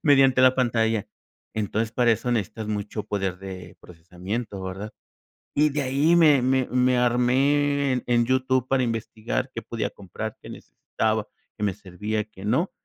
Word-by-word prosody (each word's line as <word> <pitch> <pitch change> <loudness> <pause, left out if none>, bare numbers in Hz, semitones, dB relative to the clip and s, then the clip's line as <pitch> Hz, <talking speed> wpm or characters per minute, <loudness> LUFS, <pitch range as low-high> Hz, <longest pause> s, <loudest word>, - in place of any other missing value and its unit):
mediante 135 -3 +5
la 130 0 +6
pantalla". 115 -4 +1 0.5
Entonces, 110 +1 -1
para 120 -2 +3
eso 120 +3 -2
necesitas 110 0 -2
mucho 105 0 -3
poder 95 -3 -2
de 95 -3 -9
procesamiento, 90 +5 -6
¿verdad? 95 +3 -6 0.6
Y 150 +1 +4
de 145 +1 -1
ahí 140 +6 +3
me 150 -6 +6
me 130 0 +2
me 125 0 +3
armé 135 +3 +2
en 125 - -2
en 120 -1 +3
YouTube 130 0 +1
para 135 -1 +2
investigar 115 +2 -3
qué 115 - -3
podía 115 -1 -3
comprar, 105 +3 -7
qué - - -11
necesitaba, 110 -1 -3 0.3
qué 105 - -4
me 100 -3 +1
servía, 105 +3 -4
qué 100 -3 -14
no, 155 - +1
115 Hz, 160 wpm, -25 LUFS, 105-130 Hz, 0.6 s, la